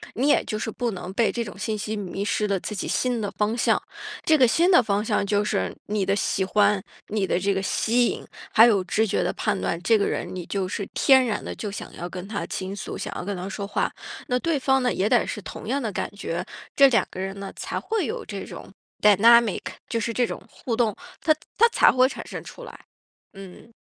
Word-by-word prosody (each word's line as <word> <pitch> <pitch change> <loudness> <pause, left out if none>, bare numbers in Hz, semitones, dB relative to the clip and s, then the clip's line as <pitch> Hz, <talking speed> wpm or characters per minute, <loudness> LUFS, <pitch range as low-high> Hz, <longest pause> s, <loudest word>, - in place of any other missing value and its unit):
你 260 +5 +1
也 295 - +4
就 215 - -3
是 225 - -3
不 240 +2 -2
能 180 -2 -6
被 225 +1 +2
这 235 - -2
种 205 - -9
信 215 +1 -2
息 215 +1 -3
迷 195 -1 -4
失 210 +1 0
了 200 -2 0
自 210 - -6
己 195 - -3
心 245 -3 0
的 205 - -2
方 215 +2 -1
向。 - - +2 0.4
这 315 - +5
个 255 -3 +6
心 340 +10 +3
的 350 - +7
方 205 -1 0
向 215 - 0
就 205 +1 +1
是 - - -1
你 205 -2 0
的 195 +1 +1
喜 195 -1 0
欢， 205 0 +2 0.2
你 205 -2 -1
的 175 - +1
这 200 +2 +1
个 190 - -1
吸 235 +5 +2
引， - - -4 0.3
还 225 - +8
有 205 -5 +3
直 210 +4 +1
觉 205 - 0
的 - - 0
判 205 -3 -1
断， 170 - -2
这 225 +5 +4
个 200 - +1
人 - - -2
你 180 -2 -5
就 195 0 -2
是 200 +1 -4
天 265 -1 +5
然 220 -4 -2
地 - - -5
就 210 - -5
想 205 - -7
要 175 - -6
跟 180 0 -7
他 205 -1 -3
倾 190 +1 -5
诉， 190 - -6
想 - - -5
要 - - -4
跟 200 0 -3
他 180 +1 -5
说 200 0 -5
话。 - - -1 0.4
那 250 0 +1
对 325 0 0
方 265 0 +2
呢， 245 - +2
也 195 - +1
得 245 - +4
是 210 - -4
同 200 - -9
样 275 +4 0
的 225 -4 -2
感 - - -3
觉， 170 -4 -4 0.3
这 275 - +8
两 235 - +3
个 - - -8
人 195 +1 -4
呢， 200 -1 -6
才 - - -4
会 440 -6 -1
有 225 - -4
这 200 -2 -6
种 - - -10 0.3
dynamic， 220 +1 +6 0.3
就 230 - -1
是 230 +1 -2
这 245 +2 +2
种 - - -6
互 235 - -4
动， 225 -3 +1 0.3
它 310 - +4 0.2
它 465 - +7
才 - - +5
会 255 0 +4
产 - - -7
生 - - -7
出 - - -11
来， - - -12 0.5
嗯。 195 +3 -12
210 Hz, 280 characters per minute, -24 LUFS, 195-235 Hz, 0.5 s, 还